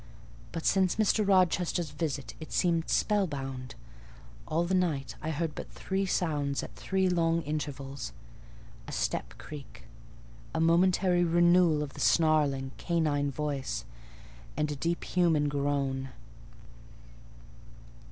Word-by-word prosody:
But 165 -1 -5
since 190 -2 +3
Mr. 215 0 +3
Rochester's 180 -4 +2
visit 145 -3 -3
it 155 - -9
seemed 170 -2 +1
spellbound: 135 - -1 0.7
all 165 +2 +1
the 185 - -1
night 165 -7 0
I 155 - -3
heard 160 0 -2
but - - -7
three 195 0 -2
sounds 145 -6 0
at - - -9
three 190 0 0
long 170 -2 +2
intervals,—a 140 - -7
step - - -2
creak, 145 -5 -10 0.7
a - - +1
momentary 175 +2 +3
renewal 175 -2 +4
of 140 - -7
the - - -10
snarling, 145 -5 +3
canine 150 -4 0
noise, 140 - -2 0.7
and 150 0 0
a - - -3
deep 170 +4 -2
human 165 -5 +2
groan. 140 -2 -1
155 Hz, 115 wpm, -30 LUFS, 140-175 Hz, 0.7 s, renewal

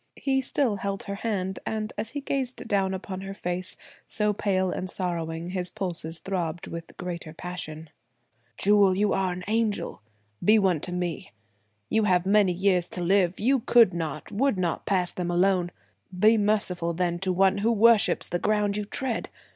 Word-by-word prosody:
He 265 -1 0
still 255 -5 0
held 195 0 -3
her 200 - -5
hand; 200 -3 -2
and 215 0 -3
as 220 +2 -3
he 285 - -5
gazed 265 -2 -3
down 195 -2 +1
upon 190 0 -6
her 195 0 -7
face, 180 0 -3 0.3
so 210 -1 +1
pale 190 -2 0
and 185 - -3
sorrowing, 170 -2 -3
his 180 -1 -2
pulses 170 -3 -3
throbbed 175 -3 -3
with 165 0 -8
greater 170 -3 -6
passion. 160 -3 -7 0.7
"Jewel 200 -2 +4
you 205 +1 +2
are 190 -1 0
an 180 +1 -6
angel! 220 - -1 0.4
Be 215 +1 +6
one 190 -6 +2
to 180 - -4
me. 180 -3 -4 0.5
You 220 - +2
have 180 -2 +2
many 200 -1 +4
years 180 -1 +1
to 180 - -5
live; 185 0 +2
you 265 +4 +3
could 235 -4 +5
not, 155 -4 -4
would 250 +1 +1
not 175 -3 -2
pass 180 -3 +2
them 180 -1 -3
alone. 180 0 +2 0.5
Be 215 +4 +5
merciful 200 -5 +1
then 175 0 -1
to 190 0 0
one 190 +2 +3
who 225 +3 +2
worships 230 -1 +4
the 175 - -2
ground 210 0 +1
you 210 - -2
tread! 245 +2 -2
190 Hz, 175 wpm, -26 LUFS, 180-210 Hz, 0.7 s, Be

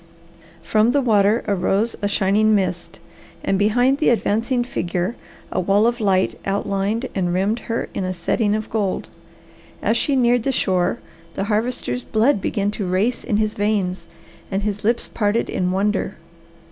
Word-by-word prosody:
From 215 +7 +2
the 285 - +3
water 215 -1 +3
arose 200 +3 +1
a 205 - +1
shining 205 +2 +3
mist, 185 -3 -2 0.4
and 195 - +1
behind 245 +7 +3
the - - +3
advancing 240 +2 +1
figure 180 -1 -2 0.4
a - - -1
wall 195 +4 +3
of 240 0 0
light 190 -2 +2
outlined 200 +4 -1
and 180 -3 0
rimmed 195 +6 0
her 230 - -1
in - - -2
a 185 - -1
setting 205 +4 0
of 215 0 -3
gold. 205 -4 -1 0.7
As - - +1
she 285 - +1
neared 245 -1 +3
the 270 - 0
shore 185 -7 +1 0.4
the - - -1
Harvester's 230 +4 -1
blood 225 0 +1
began 205 -1 -1
to 205 -2 -4
race 205 +7 0
in 205 - 0
his 215 0 0
veins 190 -4 -1 0.4
and 195 +1 -2
his 205 -1 -3
lips 230 +3 +1
parted 210 +1 0
in 180 -1 0
wonder. 200 +3 0
210 Hz, 160 wpm, -21 LUFS, 195-230 Hz, 0.7 s, the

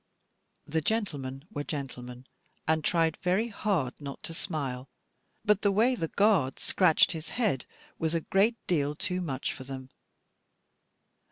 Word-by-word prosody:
The 160 +2 0
gentlemen 145 -10 -2
were 145 - -3
gentlemen, 125 -4 -6 0.4
and 160 0 +2
tried 165 -2 +2
very 190 +6 +2
hard 190 - 0
not 140 -1 -7
to 165 - -5
smile; 140 -7 -3 0.6
but 210 -2 +4
the 200 - +3
way 225 +6 +4
the 165 -10 -1
guard 190 -9 +3
scratched 180 -5 +4
his 160 -2 -5
head 210 - 0 0.3
was 160 0 0
a 165 - +1
great 205 +8 +3
deal 150 -4 +1
too 180 +4 -2
much 140 -6 -2
for 130 - -9
them. 130 0 -7
160 Hz, 145 wpm, -29 LUFS, 135-195 Hz, 0.6 s, but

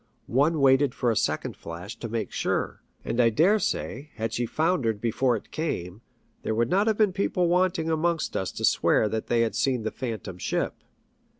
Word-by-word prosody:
One 145 +5 +2
waited 135 0 +4
for 120 -2 +1
a - - 0
second - - -1
flash 85 +6 -8
to 115 - -6
make 110 -3 -3
sure; - - -2 0.2
and 120 - +1
I 115 - +5
dare 175 - +4
say, 145 - -3
had 115 -1 -3
she 120 0 -1
foundered 135 - 0
before 120 +2 +1
it 105 - -8
came, 105 - -3 0.4
there 110 - -2
would 120 +6 +1
not 200 +4 +3
have 220 -2 +2
been 210 -4 +3
wanting 180 -2 +1
people 165 - 0
amongst 165 0 0
us 95 - -1
to - - -1
swear 110 - +3
that 110 +1 -3
they 120 -1 +2
had 115 - +1
seen 130 -4 0
the 110 - -2
Phantom 110 -7 -5
Ship. - - -1
125 Hz, 195 wpm, -26 LUFS, 110-165 Hz, 0.4 s, I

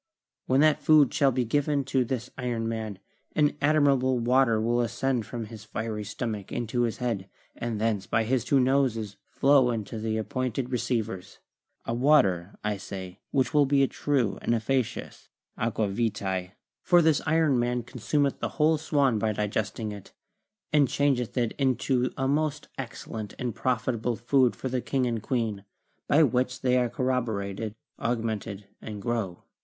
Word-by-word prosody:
When 130 +2 +4
that 155 -1 +4
food 150 -4 +5
shall 140 -3 +3
be 125 -1 0
given 145 +3 +1
to 135 -1 +1
this 125 0 -4
iron 120 -3 -2
man, 110 -3 -4 0.4
an 150 -1 +3
admirable 140 -4 +3
water 120 -1 +3
will 120 +2 +1
ascend 120 0 -1
from 120 -2 -5
his 110 -1 -10
fiery 110 0 -4
stomach 105 -1 -5
into 120 0 -1
his 115 -2 0
head, 110 -6 -2 0.3
and 115 -3 -3
thence 105 -3 0
by 110 - +2
his 120 +1 +1
two 140 - +3
noses 125 -6 +1
flow 135 -3 +4
into 110 -1 -3
the 110 0 -1
appointed 130 +2 -2
receivers; 110 -6 -2 0.5
a 115 - -2
water, 105 - +3
I 105 -1 -1
say, 95 -1 -8
which 130 -4 +1
will 145 -2 +4
be 140 0 +4
a - - +3
true 130 -8 0
and 120 - +1
efficacious 120 +1 -2 0.3
aqua 110 -1 0
vitae; 95 -4 -2 0.3
for 175 -2 +5
the 155 -2 +3
iron 155 -5 +3
man 120 0 0
consumeth 135 +4 -1
the - - -2
whole 155 0 +3
swan 140 -7 +2
by 110 0 0
digesting 105 +1 -2
it, 100 -2 -10 0.6
and 145 -2 +5
changeth 130 -4 0
it 120 -2 +1
into 130 -1 +1
a 135 - 0
most 150 +1 -1
excellent 110 -4 -6
and 125 -3 -3
profitable 120 -1 -1
food 125 +2 +2
for - - -4
the 125 -1 -1
king 130 0 0
and 115 -2 -1
queen, 110 -4 -2 0.4
by 155 +3 +5
which 125 -1 0
they 125 -1 +2
are 125 -1 +2
corroborated, 110 -5 -2 0.2
augmented, 110 -3 -2 0.2
and 105 -2 -6
grow. 100 -5 -3
120 Hz, 160 wpm, -27 LUFS, 110-135 Hz, 0.6 s, food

